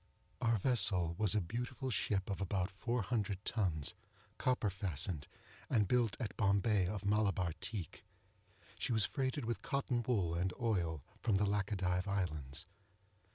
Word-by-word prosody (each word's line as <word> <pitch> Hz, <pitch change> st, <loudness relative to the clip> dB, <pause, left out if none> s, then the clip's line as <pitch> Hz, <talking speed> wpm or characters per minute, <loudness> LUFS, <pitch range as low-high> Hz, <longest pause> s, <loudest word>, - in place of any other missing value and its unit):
Our 115 Hz, -2 st, +3 dB
vessel 95 Hz, -7 st, +3 dB
was 105 Hz, -2 st, +3 dB
a 105 Hz, -, +3 dB
beautiful 125 Hz, +8 st, -3 dB
ship 100 Hz, -4 st, 0 dB
of 100 Hz, -, -3 dB
about 95 Hz, -1 st, 0 dB
four 115 Hz, +4 st, -1 dB
hundred 105 Hz, -2 st, -1 dB
tons, 90 Hz, -10 st, 0 dB, 0.5 s
copper 125 Hz, -5 st, +1 dB
fastened, 90 Hz, -5 st, 0 dB, 0.4 s
and 105 Hz, -5 st, +3 dB
built 120 Hz, -2 st, +2 dB
at 110 Hz, -6 st, -3 dB
Bombay 100 Hz, -1 st, +3 dB
of 100 Hz, +1 st, -4 dB
Malabar 100 Hz, -4 st, +2 dB
teak. 95 Hz, -5 st, -5 dB, 0.8 s
She -, -, -1 dB
was 110 Hz, -4 st, +3 dB
freighted 130 Hz, -1 st, -1 dB
with 120 Hz, 0 st, -2 dB
cotton 130 Hz, -3 st, 0 dB
wool 105 Hz, -9 st, +1 dB
and 90 Hz, +2 st, 0 dB
oil, 85 Hz, -, 0 dB, 0.2 s
from 110 Hz, -3 st, +1 dB
the 100 Hz, +2 st, +3 dB
Lachadive 95 Hz, -2 st, 0 dB
islands. 75 Hz, -9 st, -2 dB
100 Hz, 145 wpm, -36 LUFS, 90-115 Hz, 0.8 s, Our